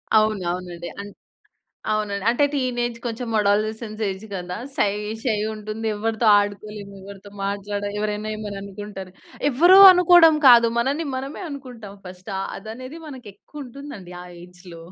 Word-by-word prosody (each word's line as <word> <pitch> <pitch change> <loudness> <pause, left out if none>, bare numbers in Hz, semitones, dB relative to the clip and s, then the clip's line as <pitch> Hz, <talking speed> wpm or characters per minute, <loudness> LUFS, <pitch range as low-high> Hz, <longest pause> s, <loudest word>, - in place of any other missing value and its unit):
అవును. 215 -3 +2
అవునండి. 175 -1 -6
అన్ 205 0 -9 0.8
అవునండి. 205 -2 -2
అంటే 245 +5 +2
టీనేజ్ 240 -3 -2
కొంచెం 235 +1 -4
అడోలసెన్స్ 215 +2 -1
ఏజ్ 190 +2 -7
కదా! 180 -1 -5 0.2
షై, 205 -8 +1 0.3
షై 225 -5 0 0.2
ఉంటుంది. 215 +1 -5
ఎవరితో 225 +2 -2
ఆడుకోలేము, 205 0 -6
ఎవరితో 200 +1 -12
మాట్లాడాలి 205 +1 -3
ఎవరైనా 210 0 -3
ఏమైనా 205 -2 -6
అనుకుంటారు. 200 -1 -9 0.4
ఎవ్వరో 345 +8 +6
అనుకోవడం 350 -3 +6
కాదు, 235 -2 +7
మనల్ని 280 +7 -1
మనమే 270 +7 -6
అనుకుంటాం 250 -8 -9
ఫస్ట్ 185 +2 -10 0.3
అదనేది 255 +8 -9
మనకు 260 -6 -10
ఎక్కువ 290 +8 -11
ఉంటుందండి. 245 -8 -10
ఆ - - -12 0.2
ఏజ్‌‌‌లో 180 -1 -13
215 Hz, 135 wpm, -22 LUFS, 200-250 Hz, 0.8 s, కాదు